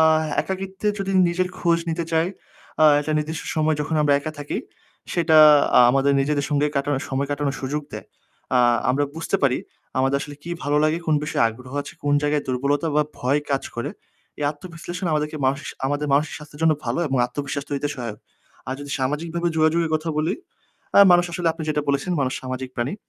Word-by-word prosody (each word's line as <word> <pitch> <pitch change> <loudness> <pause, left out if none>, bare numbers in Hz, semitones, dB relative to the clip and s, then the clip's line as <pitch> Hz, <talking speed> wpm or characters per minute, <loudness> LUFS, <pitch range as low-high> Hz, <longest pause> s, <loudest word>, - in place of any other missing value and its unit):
আ - - +7 0.4
একাকীত্বে 190 +2 -3
যদি 195 0 -2 0.2
নিজের 180 +1 0
খোঁজ 170 -1 +2
নিতে 165 +1 -2
চাই, 160 +1 +3 0.6
আ - - +8 0.2
একটা 155 +1 -2
নির্দিষ্ট 155 +1 -3
সময় 155 0 +2
যখন 150 +2 -2
আমরা 145 -1 +4
একা 155 +2 -5
থাকি 145 - -3 0.5
সেটা 165 -2 +4 0.4
আ - - +9
আমাদের 135 +2 +3
নিজেদের 145 0 0
সঙ্গে 145 0 +2
কাটানো 140 0 0
সময় 135 +1 -1
কাটানোর 145 -1 -1
সুযোগ 145 +3 -2
দেয়। - - -7 0.5
আ - - +5 0.3
আমরা 140 +3 +1
বুঝতে 165 +4 0
পারি 130 -2 +3 0.4
আমাদের 135 +1 +2
আসলে 145 0 -7
কি 170 - -7
ভালো 145 +1 +1
লাগে, 155 +2 +1
কোন 155 - +3
বিষয়ে 150 - +1
আগ্রহ 125 +3 -11
আছে, - - -10
কোন 145 0 +2
জায়গায় 145 0 +1
দুর্বলতা 140 +4 0
বা 150 - +5 0.2
ভয় 135 +4 +1
কাজ 135 -1 +1
করে। 120 - -3 0.5
এই - - 0
আত্মবিশ্লেষণ 175 +3 -7
আমাদের 150 0 0 0.2
মাস 135 +1 +1 0.3
আমাদের 145 +2 -1
মানসিক 150 +3 +2
স্বাস্থ্যের 150 -1 -13
জন্য 160 -1 +5
ভালো - - -1
এবং 135 - 0
আত্মবিশ্বাস 140 +2 -4
তৈরিতে 145 +1 -1
সহায়ক। 115 -4 -6 0.5
আর 130 - -2
যদি 145 0 -8
সামাজিকভাবে 165 +6 -1
যোগাযোগে 160 +1 +3
কথা 155 +1 -6
বলি, 160 +6 +1 0.6
আ - - +9
মানুষ 175 0 +5
আসলে 170 -1 0
আপনি 160 0 -8
যেটা 150 0 0
বলেছেন, 140 +6 0
মানুষ 130 -1 0
সামাজিক 130 0 -5
প্রাণী। 120 +6 -1
150 Hz, 190 wpm, -23 LUFS, 140-160 Hz, 0.6 s, আ